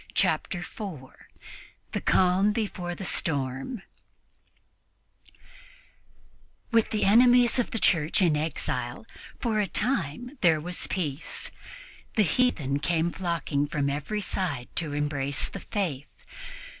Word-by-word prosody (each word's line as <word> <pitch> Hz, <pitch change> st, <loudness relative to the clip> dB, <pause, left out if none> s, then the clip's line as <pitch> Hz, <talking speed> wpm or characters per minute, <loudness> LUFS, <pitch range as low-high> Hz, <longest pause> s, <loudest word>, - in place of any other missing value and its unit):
Chapter 175 Hz, -3 st, +1 dB
4 175 Hz, -, -9 dB, 0.6 s
THE -, -, -2 dB
CALM 190 Hz, +3 st, +3 dB
BEFORE 185 Hz, -5 st, -3 dB
THE 195 Hz, -, -7 dB
STORM 140 Hz, -, 0 dB, 2.9 s
WITH 230 Hz, -2 st, +3 dB
the 215 Hz, -, -1 dB
enemies 245 Hz, +4 st, +6 dB
of 245 Hz, -, 0 dB
the -, -, -3 dB
Church 165 Hz, -6 st, +2 dB
in 170 Hz, -5 st, +4 dB
exile, 155 Hz, +2 st, -2 dB, 0.3 s
for 225 Hz, -3 st, 0 dB
a 205 Hz, -, +1 dB
time 245 Hz, -, -2 dB
there 165 Hz, -3 st, +4 dB
was 175 Hz, +3 st, -2 dB
peace. 155 Hz, -5 st, -2 dB, 0.6 s
The 215 Hz, -, +5 dB
heathen 160 Hz, -, +1 dB
came 165 Hz, +2 st, +1 dB
flocking 165 Hz, -6 st, -1 dB
from 145 Hz, -1 st, -1 dB
every 150 Hz, +10 st, -3 dB
side 155 Hz, -11 st, -2 dB
to 155 Hz, -4 st, -1 dB
embrace 145 Hz, -2 st, 0 dB
the -, -, -7 dB
Faith. 160 Hz, -10 st, -3 dB
175 Hz, 115 wpm, -27 LUFS, 145-210 Hz, 2.9 s, enemies